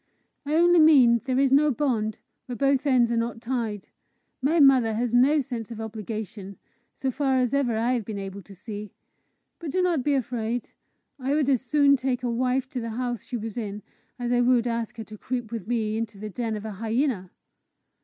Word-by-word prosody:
"I 300 - 0
only 345 +1 +5
mean 260 -7 +6
there 260 -1 0
is 270 -1 +3
no 295 +2 +5
bond 235 -6 -1 0.3
where 250 - -5
both 275 +1 +1
ends 245 -3 +3
are 235 - +1
not 230 0 -2
tied. 230 -5 -3 0.5
My 310 +6 +2
mother 260 -6 +5
has 235 +1 -1
no 275 +5 +4
sense 240 -5 -6
of 230 -2 -8
obligation, 215 -2 -6 0.4
so 265 - -2
far 270 0 +1
as 250 0 +1
ever 255 -5 +1
I 235 +3 +1
have 240 -3 -1
been 210 0 -6
able 195 0 -6
to 195 +1 -15
see. 210 +1 -8 0.7
But 335 - -6
do 370 - -1
not 340 -7 +1
be 290 0 +2
afraid: 240 -2 -2 0.5
I 270 +2 0
would 290 -2 +2
as 255 - +2
soon 280 +1 +4
take 255 -1 -2
a 245 - 0
wife 255 +2 0
to 255 - -4
the 230 -1 -4
house 240 +1 -3
she 245 - -5
was 225 +1 -5
in, 205 -2 -5 0.3
as 245 -1 -3
I 245 - +3
would 245 -1 +3
ask 230 -1 -3
her 225 - -5
to 215 -1 -12
creep 245 -3 -4
with 225 -5 -5
me 220 -2 -1
into 225 -2 -4
the 210 +1 -7
den 225 +1 -3
of 210 0 -6
a 220 - -4
hyena." 225 -1 -1
240 Hz, 210 wpm, -25 LUFS, 220-265 Hz, 0.7 s, mean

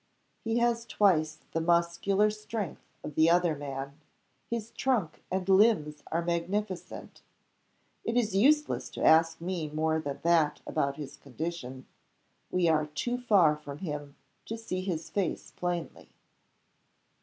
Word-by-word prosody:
"He 225 +1 0
has 235 -1 +1
twice 155 -6 +2
the 165 - -1
muscular 170 +5 +2
strength 215 -3 -5 0.2
of 150 - -6
the 160 +3 +4
other 175 -2 +3
man. 140 +1 -6 0.5
His 230 -1 -3
trunk 220 -12 -1
and 190 0 -2
limbs 190 -7 +4
are 170 +1 0
magnificent. 180 +2 -3 0.8
It 230 +1 -1
is 215 -5 +1
useless 295 +8 +3
to - - -2
ask 165 0 +5
me 170 -2 -3
more 160 +1 0
than 140 -3 -5
that 160 -3 +3
about 140 -3 -1
his 150 -3 -7
condition. 135 -2 -6 0.6
We 180 -2 +2
are 155 -2 +2
too 240 +12 -2
far 195 -11 +4
from 145 -2 -9
him 150 -4 -5 0.3
to 225 - -4
see 185 -5 -4
his 175 -4 -4
face 195 -4 -2
plainly." 175 -2 -4
170 Hz, 135 wpm, -29 LUFS, 155-205 Hz, 0.8 s, ask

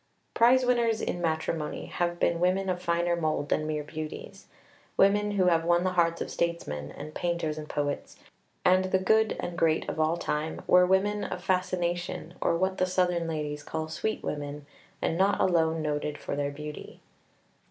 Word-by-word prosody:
Prize 250 +2 +5
winners 235 -3 +2
in 175 - -3
matrimony 160 -1 -2
have 175 0 -2
been 170 - +2
women 185 +2 +1
of 180 -1 -1
finer 170 0 +1
mould 155 -3 -1
than 155 - +1
mere 150 -1 -2
beauties. 155 +1 -7 0.5
Women 205 +1 +4
who 190 -2 +2
have 165 -2 +3
won 175 +1 +3
the 185 - +1
hearts 170 -2 +1
of - - -4
statesmen, 75 - -2
and 150 - -9
painters 170 -3 -1
and 155 -1 -8
poets, 145 -1 -3 0.5
and 185 +1 +5
the 185 0 +2
good 220 +3 +2
and 175 - -4
great 160 -1 +2
of - - -4
all 155 +2 +2
time, 155 -1 -3
were 180 0 +6
women 205 +2 +2
of 180 - -5
fascination, 175 -2 -1
or 170 - +2
what 190 +2 0
the 185 - +2
Southern 180 -2 +1
ladies 150 -2 -3
call 160 +2 -4
sweet 220 +7 -3
women, 145 0 -4 0.4
and 165 - 0
not 195 +2 +3
alone 165 -3 +2
noted 150 0 -2
for - - -4
their 145 0 -1
beauty. 150 +1 -8
170 Hz, 175 wpm, -28 LUFS, 155-185 Hz, 0.5 s, were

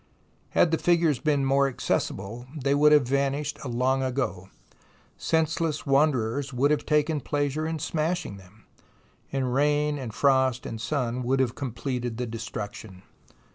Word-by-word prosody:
Had 165 - +5
the 165 - +1
figures 170 -6 +2
been 145 -2 +1
more 140 +1 +3
accessible, 120 -2 -3
they 140 0 +1
would 150 +1 +5
have 145 -5 +5
vanished 140 +2 -1
long 130 +1 0
ago. 125 -8 -2 0.7
Senseless 160 -1 0
wanderers 140 -2 +1
would 135 +3 +2
have 150 - 0
taken 150 0 +2
pleasure 145 +2 -1
in 160 0 -2
smashing 155 - -2
them, 95 +3 -18 0.7
and 130 -2 -1
rain 145 +1 +1
and 125 -4 -5
frost 130 0 +2
and 115 -1 -5
sun 125 -2 -1
would 130 +2 0
have 125 -3 +1
completed 125 -2 -4
the 125 - -2
destruction. 110 -4 -7
135 Hz, 140 wpm, -26 LUFS, 120-150 Hz, 0.7 s, Had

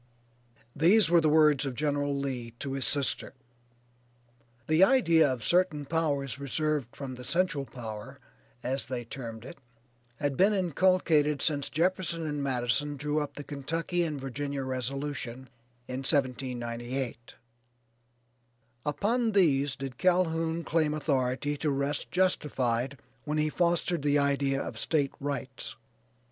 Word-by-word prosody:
These 175 +4 +5
were 170 -1 +6
the 155 - +3
words 150 -2 +5
of 135 -3 -3
General 145 0 0
Lee 125 -4 -4
to 135 +1 -4
his 135 -1 0
sister. 140 -1 0 1.3
The 155 +6 +4
idea 170 - +5
of 125 -4 -4
certain 175 - +2
power 150 -3 0
reserved 145 -2 -1
from 135 -2 -6
the 125 0 -9
"central 170 -1 0
power," 110 -4 -8 0.4
as 135 +1 -1
they 120 -1 -4
termed 115 -2 -7
it, 135 - -10 0.6
had 145 -1 -1
been 200 +8 +4
inculcated 170 -5 +2
since 145 -3 +1
Jefferson 170 0 0
and 150 -1 -2
Madison 135 +2 0
drew 150 +2 -1
up 145 -1 -4
the 145 - -6
Kentucky 165 +5 -2
and 155 -4 -2
Virginia 135 +1 -4
resolution 130 0 -4 0.4
in 125 - -4
1798. 125 -3 -2 1.5
Upon 220 - 0
these 145 -8 +3
did 135 -2 -7
Calhoun 165 -2 +1
claim 155 -2 +1
authority 140 -1 0
to 150 - -1
rest 140 +1 -1
justified 135 -8 0 0.3
when 150 +1 -1
he 155 0 +2
fostered 170 0 +1
the 145 0 +2
idea 140 -1 +1
of 110 -4 -5
State 145 -1 0
Rights. 140 -2 -4
145 Hz, 130 wpm, -29 LUFS, 130-160 Hz, 1.5 s, were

